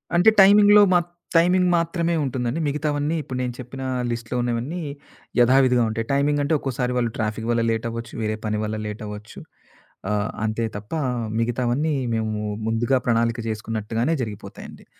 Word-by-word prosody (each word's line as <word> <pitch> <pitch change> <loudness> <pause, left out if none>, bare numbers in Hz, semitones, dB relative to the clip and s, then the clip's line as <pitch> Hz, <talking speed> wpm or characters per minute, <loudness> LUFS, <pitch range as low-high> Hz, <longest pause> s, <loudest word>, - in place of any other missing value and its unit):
అంటే 175 +5 +6
టైమింగ్‌లో 205 +1 +7
మాత్ 175 -1 +2 0.3
టైమింగ్ 180 +2 +4
మాత్రమే 170 0 0
ఉంటుందండి. 130 +1 -2
మిగతావన్నీ 150 +1 -1
ఇప్పుడు 130 -3 -6
నేను 125 -1 -2
చెప్పిన 130 +2 -7 0.3
లిస్ట్‌లో 115 +1 -4
ఉన్నవన్నీ, 120 +8 -2 0.6
యధావిధిగా 125 0 +5
ఉంటాయి. 115 +1 -3
టైమింగ్ 145 +1 +2
అంటే 145 - 0
ఒక్కోసారి 125 -2 -2
వాళ్ళు 120 -2 0
ట్రాఫిక్ 110 0 -2
వల్ల 115 0 +2
లేటవ్వచ్చు, 115 +1 -4
వేరే 110 0 -1
పని 105 0 -1
వల్ల 110 0 -3
లేటవ్వచ్చు. 105 0 -8 0.7
ఆహ్, 105 0 0 0.2
అంతే 110 +2 -1
తప్ప 105 +8 -9 0.5
మిగతావన్నీ 125 +6 0 0.2
మేము 110 -1 -2 0.3
ముందుగా 115 +4 +1
ప్రణాళిక 115 0 +1
జేసుకున్నట్టుగానే 110 +6 -2
జరిగిపోతాయండి. 105 -3 -9
120 Hz, 135 wpm, -23 LUFS, 115-145 Hz, 0.7 s, టైమింగ్‌లో